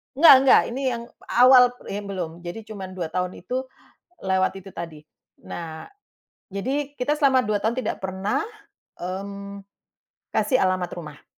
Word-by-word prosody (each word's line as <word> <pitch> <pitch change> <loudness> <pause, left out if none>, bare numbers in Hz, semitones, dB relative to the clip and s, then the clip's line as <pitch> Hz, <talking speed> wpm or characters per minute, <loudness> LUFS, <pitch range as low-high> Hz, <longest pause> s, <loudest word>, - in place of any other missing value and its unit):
Nggak 310 0 +9
nggak, 265 - +7
ini 265 +3 -4
yang 235 0 -5 0.2
awal 250 0 +7 0.2
ini 205 +1 -3
belum. 185 -5 -4
Jadi 175 +6 -5
cuman 190 -3 -7
2 170 -3 -4
tahun 180 0 -2
itu, 255 +8 -4 0.5
lewat 190 0 +1
itu 195 +1 -12
tadi. 165 -3 -7 0.5
Nah, 160 -2 -7 0.6
jadi, 270 +9 -2
kita 290 +4 +1
selama 275 -3 +4
2 210 0 +1
tahun 230 +4 0
tidak 250 - -4
pernah, 190 - -1 0.6
mmm, 200 +2 -6 0.7
kasih 260 - +2
alamat 185 -5 +1
rumah. 150 -4 -9
200 Hz, 140 wpm, -24 LUFS, 180-250 Hz, 0.7 s, Nggak